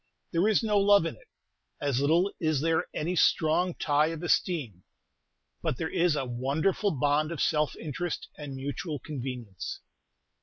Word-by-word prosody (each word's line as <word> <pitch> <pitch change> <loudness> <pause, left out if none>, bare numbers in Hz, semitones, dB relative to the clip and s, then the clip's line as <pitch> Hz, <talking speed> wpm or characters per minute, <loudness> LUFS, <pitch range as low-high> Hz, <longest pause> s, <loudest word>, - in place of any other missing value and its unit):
There 170 +4 +2
is 220 +1 +3
no 210 -2 +3
love 200 -3 +5
in 165 - -3
it; - - -21 0.5
as 140 -3 0
little 170 +7 +3
is 155 -4 +1
there 165 +1 +1
any 170 +4 -2
strong 175 +2 +3
tie 150 0 +2
of 165 0 -5
esteem: 145 - 0 0.8
but - - -1
there 160 - -3
is 175 -2 +2
a 135 - -1
wonderful 140 - 0
bond 145 +1 +1
of 165 - -5
self 150 -1 +1
interest 165 +2 -4
and 145 -3 -7
mutual 145 +4 -4
convenience. 125 - -6
155 Hz, 155 wpm, -28 LUFS, 140-175 Hz, 0.8 s, love